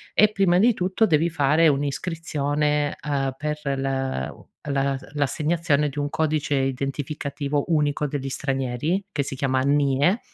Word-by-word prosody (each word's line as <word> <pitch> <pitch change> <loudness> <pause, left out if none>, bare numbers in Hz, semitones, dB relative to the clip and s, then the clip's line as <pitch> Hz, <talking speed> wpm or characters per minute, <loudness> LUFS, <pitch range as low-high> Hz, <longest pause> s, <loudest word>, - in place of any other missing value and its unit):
e 215 0 +5
prima 195 -4 +3
di 230 +6 +5
tutto 190 +3 +1
devi 165 -3 +2
fare 155 +1 +3
un'iscrizione, 145 0 -1
ehm, 140 -2 -1
per 150 0 -3 0.2
la 135 - -2
u - - -18 0.2
la 140 -1 0 0.2
l'assegnazione 150 +1 +1
di 140 - -11
un 145 0 -1
codice 155 -1 0
identificativo 140 +2 -2
unico 150 -2 +1
degli 140 -1 -4
stranieri, 135 +6 -1
che 145 - -1
si 135 - -5
chiama 130 -1 0
NIE 145 - +2
145 Hz, 140 wpm, -24 LUFS, 135-155 Hz, 0.2 s, e